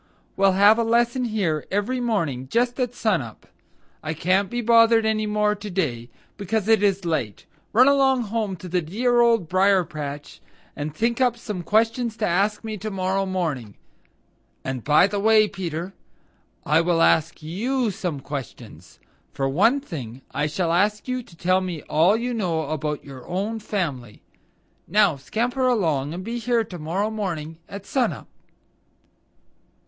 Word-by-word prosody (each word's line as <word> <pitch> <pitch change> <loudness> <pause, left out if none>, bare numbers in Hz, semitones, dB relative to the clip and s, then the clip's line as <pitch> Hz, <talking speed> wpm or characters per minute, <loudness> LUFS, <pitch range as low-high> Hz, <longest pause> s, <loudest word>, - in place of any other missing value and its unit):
We'll 195 -1 +4
have 205 +4 +5
a - - +2
lesson 240 +2 +1
here 190 -9 -1
every 205 +6 -1
morning 165 - -1
just 240 - 0
at 245 -1 -1
sun 215 -10 +1
up. 115 -3 -11 0.6
I 155 +1 -4
can't 185 +4 +1
be 240 - -3
bothered 230 -1 +5
any 215 -1 0
more 210 0 +1
to 210 0 -8
day, 130 -11 -2 0.3
because 210 +1 -2
it 220 -2 +4
is 195 -2 +1
late. 140 - -2 0.3
Run 250 +5 +6
along 270 -3 +3
home 215 -2 -2
to 180 - -10
the 180 0 0
dear 240 +9 +1
Old 230 -7 +3
Briar 190 +1 +3
patch 145 -3 -7 0.3
and 150 +1 -4
think 235 +6 0
up 245 -2 +2
some 210 -5 -5
questions 225 +4 +1
to 215 - 0
ask 200 +5 +1
me 220 -1 -5
to 215 +3 -5
morrow 190 0 -1
morning. 155 - -3 0.9
And, 130 -3 -4
by 150 +4 +5
the 200 +1 -2
way, 215 +1 +5
Peter, 175 -1 -5 0.7
I 155 +3 +4
will 170 -1 +2
ask 160 0 +2
YOU 230 +9 -1
some 180 -8 -4
questions. 140 -3 -8 0.3
For 135 - -1
one 205 - +3
thing 135 - -8
I 145 +1 0
shall 165 +2 -1
ask 210 +6 +1
you 255 0 -2
to 190 -8 -17
tell 185 +2 +2
me 175 -5 -5
all 175 +8 +3
you 245 +2 -2
know 165 -9 -2
about 150 -1 -3
your 135 -3 -11
own 205 +5 -2
family. 145 - -4 0.6
Now 200 -3 +3
scamper 245 - -1
along 160 - +1
and 185 - -6
be 235 +3 -4
here 235 0 +1
to 185 -5 -9
morrow 185 +8 -2
morning 165 -7 -4
at 200 0 -8
sun 260 -3 +1
up." - - -11
195 Hz, 165 wpm, -23 LUFS, 160-225 Hz, 0.9 s, Run